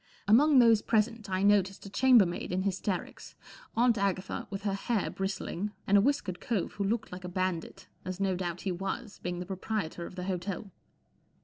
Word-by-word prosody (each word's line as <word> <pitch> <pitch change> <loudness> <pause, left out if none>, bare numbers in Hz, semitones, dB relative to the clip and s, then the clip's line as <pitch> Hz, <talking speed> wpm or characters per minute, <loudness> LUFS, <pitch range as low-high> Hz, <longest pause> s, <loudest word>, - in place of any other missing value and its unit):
Among 275 +7 +6
those 230 -3 +6
present 220 -1 0
I 185 0 0
noticed 200 -1 +3
a - - -7
chambermaid 215 -8 +4
in 185 +1 0
hysterics. 190 -1 -3 0.4
Aunt 235 -2 +4
Agatha 195 -1 -1
with 195 -1 -5
her 200 -2 0
hair 205 +1 -1
bristling, 195 +1 -3
and 200 - +3
a 200 - +7
whiskered 205 -8 0
cove 220 -8 -1
who 205 - -3
looked 220 +3 -1
like 180 0 -8
a 180 - -5
bandit, 185 0 -3 0.2
as 185 0 -5
no 195 -2 +1
doubt 175 -1 -3
he 195 - -2
was, 195 +4 -4
being 175 0 -4
the 180 - -4
proprietor 190 -2 -3
of - - -12
the 180 - -5
hotel. 190 +1 -4
195 Hz, 185 wpm, -30 LUFS, 185-215 Hz, 0.4 s, a